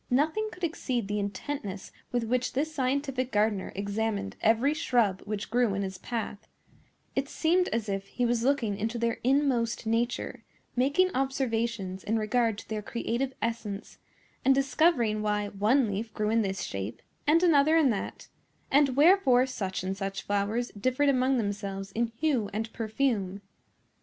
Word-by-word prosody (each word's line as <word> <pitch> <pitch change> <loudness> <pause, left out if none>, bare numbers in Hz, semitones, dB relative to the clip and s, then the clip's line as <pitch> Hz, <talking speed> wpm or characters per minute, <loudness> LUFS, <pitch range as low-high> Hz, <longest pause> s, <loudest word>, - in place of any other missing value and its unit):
Nothing 315 +12 +1
could 360 +1 -13
exceed 255 -9 -1
the 210 +1 -1
intentness 200 0 -4 0.2
with 245 -1 0
which 250 +2 0
this 310 +4 -1
scientific 265 -1 -1
gardener 210 -2 +1
examined 200 0 -2
every 230 +6 +3
shrub 235 - +1
which 210 0 -4
grew 240 -4 +2
in 200 - -1
his 190 -1 -5
path: 225 -3 -5 0.7
it 275 +1 -1
seemed 355 +3 +2
as 225 -1 -2
if 195 -1 -3
he 245 - -1
was 235 -1 +1
looking 245 -6 +1
into 220 +4 -2
their 235 0 -1
inmost 255 -4 +1
nature, 230 +2 -1 0.3
making 285 +9 +3
observations 230 -8 -1
in 225 +2 0
regard 225 0 +1
to - - -10
their 215 -1 -3
creative 235 +4 -2
essence, 220 -3 -4 0.4
and 270 0 +5
discovering 270 -6 +2
why 210 -1 0
one 215 +7 +3
leaf 210 +3 -3
grew 210 0 0
in 225 0 +3
this 195 -2 -2
shape 100 +4 -5 0.2
and 330 +4 +5
another 310 -2 +5
in 290 -6 +4
that, 205 - -4 0.4
and 275 -2 +4
wherefore 285 -5 +5
such 190 -8 -3
and 190 +1 -2
such 195 0 -4
flowers 205 +4 0
differed 255 +7 +1
among 260 0 +3
themselves 200 -2 -3
in 235 +3 0
hue 260 -9 +1
and 220 +2 -4
perfume. 220 -4 -1
230 Hz, 155 wpm, -28 LUFS, 205-270 Hz, 0.7 s, and